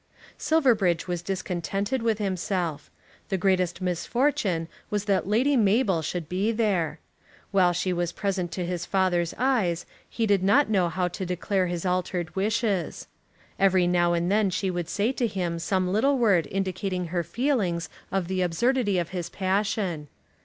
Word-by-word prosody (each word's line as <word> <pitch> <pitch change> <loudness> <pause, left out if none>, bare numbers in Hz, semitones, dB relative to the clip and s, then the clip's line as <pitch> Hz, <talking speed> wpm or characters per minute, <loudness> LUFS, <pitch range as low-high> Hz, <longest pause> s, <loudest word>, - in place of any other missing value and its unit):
Silverbridge 220 - +2
was 175 -2 -2
discontented 195 +5 -2
with 225 -2 +1
himself. 185 -6 -2 0.4
The 195 - 0
greatest 185 -1 +1
misfortune 185 - 0 0.2
was 205 -1 -1
that 195 -3 +1
Lady 250 +8 +3
Mabel 205 -5 +3
should 160 +1 -4
be 190 +6 0
there. 190 -9 0 0.5
While 185 -3 +4
she 180 +1 -1
was 175 -1 -1
present 190 -4 -2
to 180 - -2
his 175 0 -3
father's 180 -3 +1
eyes 215 -10 +1 0.2
he 230 - -1
did 200 -3 +3
not 215 +6 +4
know 185 -4 +3
how 180 +2 0
to 185 +2 -5
declare 185 +1 0
his 175 0 -3
altered 180 -2 -1
wishes. 205 -3 -1 0.5
Every 190 -2 +4
now 175 -1 +2
and 170 +2 0
then 210 -1 +3
she 185 +1 -1
would 175 -2 -3
say 215 +4 +1
to 250 -3 0
him 175 -5 -2
some 185 +2 0
little 270 +7 +3
word 200 - +3
indicating 185 -2 -2
her 175 0 -1
feelings 200 - 0 0.2
of 190 -3 -1
the 185 0 -1
absurdity 205 +4 +1
of 170 -2 -1
his 175 -3 -4
passion. 190 -4 -1
185 Hz, 160 wpm, -26 LUFS, 175-210 Hz, 0.5 s, While